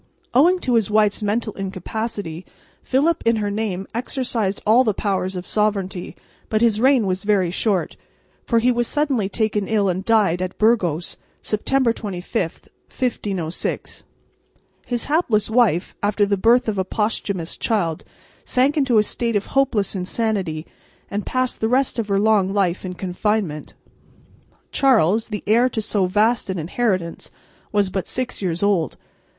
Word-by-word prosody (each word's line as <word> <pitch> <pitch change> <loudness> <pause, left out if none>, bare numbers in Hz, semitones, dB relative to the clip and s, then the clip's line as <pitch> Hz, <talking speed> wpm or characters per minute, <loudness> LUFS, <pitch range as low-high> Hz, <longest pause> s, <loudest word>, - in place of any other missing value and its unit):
Owing 335 +9 +5
to 250 - 0
his 225 -4 +2
wife's 210 -1 +2
mental 215 +1 -1
incapacity 195 -2 -5 0.4
Philip 310 +6 +1
in 230 0 +3
her 205 -2 -1
name 200 -3 -2
exercised 235 -4 -1
all 225 +4 +5
the 215 -5 0
powers 190 -2 -1
of 180 0 -5
sovereignty, 195 -4 -1 0.3
but 215 0 +1
his 220 -2 +3
reign 260 -3 +4
was 185 0 -1
very 200 -4 +1
short, 195 -1 -1 0.5
for 235 - +1
he 240 +2 +4
was 240 -1 0
suddenly 275 -9 0
taken 210 -2 -1
ill 210 -3 +2
and 185 +1 -2
died 200 -5 +2
at 185 0 -4
Burgos, 180 -8 +1 0.3
September 235 +3 +1
25, 190 -3 -4 0.3
1506. 195 -9 -3 0.8
His 240 -2 -1
hapless 250 - +1
wife, 220 -8 +2
after 205 0 +2
the 200 0 +1
birth 230 +6 +3
of 205 -3 -1
a - - +2
posthumous 200 -4 -2
child, 175 -9 -1 0.4
sank 265 +3 +2
into 265 -6 +3
a 210 - +6
state 230 +1 -2
of 205 - 0
hopeless 255 -8 +1
insanity 185 -4 -2 0.5
and 205 +1 -3
passed 255 -1 -1
the 220 - +1
rest 255 0 +1
of 220 - -1
her 200 -1 +1
long 205 -3 +3
life 190 -3 0
in 180 -1 -5
confinement. 185 -3 -2 1.0
Charles, 225 - +3
the 210 -2 -5
heir 235 +5 +4
to 235 - -3
so 205 -3 0
vast 215 +4 +1
an 190 - -2
inheritance, 180 0 -2 0.4
was 205 -2 +1
but 190 -1 -3
six 250 -3 -3
years 175 -1 -1
old. 195 -6 +1
210 Hz, 155 wpm, -21 LUFS, 190-235 Hz, 1.0 s, a